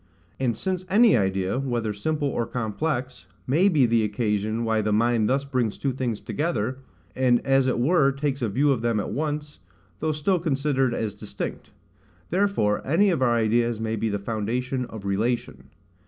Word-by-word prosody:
And 125 Hz, -3 st, 0 dB
since 185 Hz, -1 st, -2 dB
any 220 Hz, +3 st, +6 dB
idea, 95 Hz, +2 st, 0 dB
whether 120 Hz, -5 st, -1 dB
simple 150 Hz, +8 st, -1 dB
or 120 Hz, -4 st, -2 dB
complex, 125 Hz, +3 st, -3 dB, 0.2 s
may 165 Hz, +10 st, +3 dB
be 150 Hz, -8 st, +4 dB
the 115 Hz, -1 st, +2 dB
occasion 105 Hz, +1 st, -1 dB
why 110 Hz, -1 st, +1 dB
the 105 Hz, 0 st, -1 dB
mind 115 Hz, 0 st, +2 dB
thus 135 Hz, +2 st, +1 dB
brings 125 Hz, -6 st, -1 dB
two 135 Hz, -2 st, -1 dB
things 120 Hz, -4 st, -2 dB
together, 130 Hz, -5 st, -2 dB, 0.4 s
and 125 Hz, -2 st, +3 dB
as 135 Hz, -1 st, +3 dB
it 130 Hz, -, +1 dB
were 140 Hz, +2 st, +3 dB
takes 140 Hz, 0 st, -2 dB
a 115 Hz, -, 0 dB
view 140 Hz, +8 st, +2 dB
of 125 Hz, -4 st, 0 dB
them 115 Hz, -2 st, +1 dB
at -, -, -3 dB
once, 150 Hz, 0 st, -3 dB, 0.4 s
though 155 Hz, -, 0 dB
still 155 Hz, +5 st, +1 dB
considered 135 Hz, -5 st, 0 dB
as 110 Hz, -3 st, -2 dB
distinct: 105 Hz, 0 st, -6 dB, 0.6 s
therefore 185 Hz, -, +1 dB
any 185 Hz, +8 st, +3 dB
of 165 Hz, -, -1 dB
our 120 Hz, -2 st, +3 dB
ideas 115 Hz, 0 st, +1 dB
may 110 Hz, 0 st, -2 dB
be 110 Hz, +1 st, -1 dB
the 100 Hz, -, -1 dB
foundation 120 Hz, +5 st, -2 dB
of 110 Hz, -4 st, -9 dB
relation. 110 Hz, +5 st, -1 dB
125 Hz, 175 wpm, -25 LUFS, 110-140 Hz, 0.6 s, any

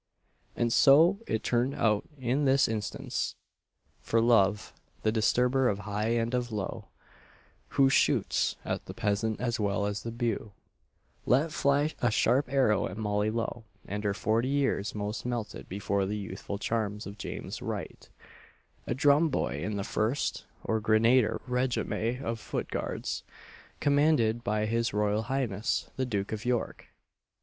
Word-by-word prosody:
And 115 Hz, -1 st, +1 dB
so 160 Hz, +8 st, +6 dB
it 110 Hz, 0 st, -1 dB
turned 125 Hz, +3 st, +1 dB
out 105 Hz, -2 st, +1 dB
in 130 Hz, +3 st, 0 dB
this 135 Hz, 0 st, +4 dB
instance 110 Hz, -3 st, -3 dB, 0.6 s
"For 115 Hz, -, +1 dB
Love, 110 Hz, -2 st, +3 dB, 0.3 s
the 110 Hz, -, +3 dB
disturber 125 Hz, +4 st, +2 dB
of 100 Hz, -, -1 dB
high 105 Hz, +1 st, -3 dB
and 115 Hz, +1 st, 0 dB
of 125 Hz, -1 st, -1 dB
low, 105 Hz, -3 st, -4 dB, 0.9 s
Who 135 Hz, -, +6 dB
shoots 135 Hz, -, +2 dB
at -, -, -3 dB
the -, -, -7 dB
peasant 105 Hz, +1 st, 0 dB
as 120 Hz, 0 st, -1 dB
well 100 Hz, 0 st, 0 dB
as 105 Hz, 0 st, -2 dB
the 115 Hz, -, -5 dB
beau," 115 Hz, -3 st, -2 dB, 0.7 s
let 145 Hz, +6 st, +3 dB
fly 145 Hz, +1 st, +2 dB
a 120 Hz, -, +3 dB
sharp 125 Hz, +4 st, +2 dB
arrow 130 Hz, -7 st, +3 dB
at 90 Hz, -, -8 dB
Molly 105 Hz, -1 st, 0 dB
Lowe; 115 Hz, +1 st, -3 dB, 0.2 s
and 105 Hz, +2 st, -4 dB
her 100 Hz, -1 st, 0 dB
forty 115 Hz, +2 st, +1 dB
years' 135 Hz, -7 st, 0 dB
frost 105 Hz, +1 st, -4 dB
melted 120 Hz, -3 st, -4 dB
before 100 Hz, 0 st, -1 dB
the 105 Hz, +2 st, -2 dB
youthful 100 Hz, 0 st, -5 dB
charms 105 Hz, -1 st, -2 dB
of 100 Hz, +2 st, -9 dB
James -, -, -6 dB
Wright -, -, -6 dB, 0.8 s
a 120 Hz, -, -1 dB
drum 145 Hz, +4 st, +4 dB
boy -, -, -1 dB
in 105 Hz, -, -2 dB
the 100 Hz, -, -2 dB
First 110 Hz, +7 st, -1 dB, 0.2 s
or 110 Hz, -, 0 dB
Grenadier 110 Hz, +3 st, +3 dB
Regiment 125 Hz, -1 st, -1 dB
of 115 Hz, 0 st, -2 dB
Foot -, -, -4 dB
Guards, -, -, -3 dB, 0.6 s
commanded 140 Hz, -6 st, +3 dB
by 105 Hz, -2 st, 0 dB
his 115 Hz, 0 st, 0 dB
Royal 105 Hz, +1 st, +1 dB
Highness 115 Hz, -4 st, -1 dB
the 130 Hz, -1 st, -1 dB
Duke 100 Hz, -4 st, -2 dB
of 110 Hz, -1 st, -4 dB
York! 125 Hz, -1 st, -2 dB
115 Hz, 150 wpm, -29 LUFS, 105-125 Hz, 0.9 s, so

